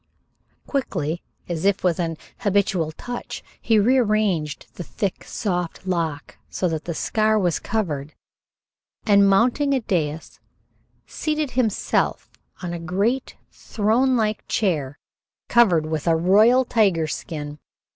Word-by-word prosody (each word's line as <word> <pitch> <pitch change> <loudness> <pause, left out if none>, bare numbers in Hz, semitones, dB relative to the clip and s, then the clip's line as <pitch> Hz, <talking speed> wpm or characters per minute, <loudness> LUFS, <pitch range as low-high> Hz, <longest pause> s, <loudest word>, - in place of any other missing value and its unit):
Quickly, 175 - -2 0.3
as 170 -2 -3
if 200 -1 +2
with 180 -2 +1
an 165 -2 -2 0.2
habitual 195 -5 +1
touch, 245 +9 -7 0.2
he 225 - +3
rearranged 210 - +2
the - - -8
thick, 200 +1 -3
soft 180 -4 -3
lock 165 -6 -3
so 185 - -1
that 160 -1 -4
the 170 - -4
scar 215 +4 +1
was 180 -5 +1
covered, 155 -10 -3 0.9
and 200 -2 +5
mounting 250 +8 +3
a - - +2
dais, 160 -8 -3 0.7
seated 305 -3 -2
himself 235 -5 0 0.3
on 175 -1 -3
a 170 - -4
great 200 +10 -1 0.2
thronelike 220 0 +1
chair 150 -9 -1 0.5
covered 185 -10 +4
with 155 0 -3
a 165 - +4
royal 215 +10 +5
tiger 195 -9 +2
skin. 150 -1 -6
190 Hz, 120 wpm, -23 LUFS, 165-220 Hz, 0.9 s, and